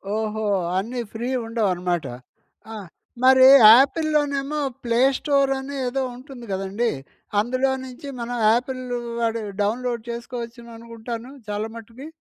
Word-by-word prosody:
ఓహో! 220 Hz, 0 st, -2 dB, 0.3 s
అన్ని 235 Hz, +6 st, -3 dB
ఫ్రీ 230 Hz, +2 st, -4 dB, 0.2 s
ఉండవనమాట. 180 Hz, -7 st, -1 dB, 0.7 s
ఆహ్, 205 Hz, -4 st, -8 dB, 0.4 s
మరి 260 Hz, 0 st, +7 dB, 0.3 s
ఆపిల్‌లో 305 Hz, +3 st, +2 dB
నేమో 280 Hz, +2 st, -2 dB, 0.2 s
ప్లే 235 Hz, 0 st, 0 dB, 0.2 s
స్టోర్ 275 Hz, -2 st, +1 dB
అని 275 Hz, +1 st, -7 dB
ఏదో 270 Hz, +2 st, -1 dB
ఉంటుంది 255 Hz, -1 st, -11 dB
కదండీ. 195 Hz, +5 st, -1 dB, 0.5 s
అందులో 255 Hz, +5 st, +1 dB
నుంచి 260 Hz, +3 st, -10 dB
మనం 240 Hz, +1 st, -4 dB, 0.2 s
ఆపిల్ 255 Hz, +2 st, -2 dB, 0.4 s
వాడు 230 Hz, 0 st, 0 dB, 0.2 s
డౌన్లోడ్ 235 Hz, +2 st, -1 dB
చేసుకోవచ్చుననుకుంటాను 235 Hz, 0 st, -7 dB, 0.2 s
చాలా 210 Hz, +1 st, -3 dB
మట్టుకి. 230 Hz, +5 st, -11 dB
235 Hz, 115 wpm, -23 LUFS, 225-260 Hz, 0.7 s, మరి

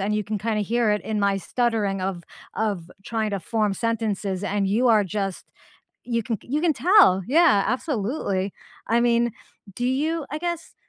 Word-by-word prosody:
and 205 Hz, +2 st, 0 dB
you 210 Hz, -1 st, -1 dB
can 215 Hz, -1 st, -3 dB
kinda 215 Hz, +1 st, -1 dB
hear 230 Hz, +1 st, +1 dB
it 210 Hz, -, -1 dB
in 215 Hz, -1 st, -2 dB
my 200 Hz, -1 st, +2 dB
stuttering 210 Hz, -2 st, -1 dB
of 185 Hz, -2 st, -3 dB, 0.3 s
of 200 Hz, -6 st, -2 dB
trying 220 Hz, -2 st, -2 dB
to 200 Hz, -2 st, -2 dB
form 210 Hz, +2 st, 0 dB
sentences 210 Hz, -4 st, -2 dB
and 205 Hz, -1 st, 0 dB
you 225 Hz, +6 st, +2 dB
are 215 Hz, -3 st, +5 dB
just 195 Hz, 0 st, -4 dB, 0.5 s
you 235 Hz, -1 st, -1 dB
can 225 Hz, 0 st, -3 dB
you 290 Hz, +5 st, -2 dB
can 335 Hz, -1 st, +3 dB
tell. 305 Hz, -, +5 dB
Yeah. 285 Hz, -, +4 dB
Absolutely. 215 Hz, -, -1 dB, 0.3 s
I 230 Hz, +1 st, +2 dB
mean 235 Hz, -1 st, +2 dB, 0.4 s
do 245 Hz, -, -2 dB
you 305 Hz, +4 st, 0 dB
I 300 Hz, -, -3 dB
guess 345 Hz, 0 st, -4 dB
220 Hz, 175 wpm, -24 LUFS, 200-245 Hz, 0.5 s, are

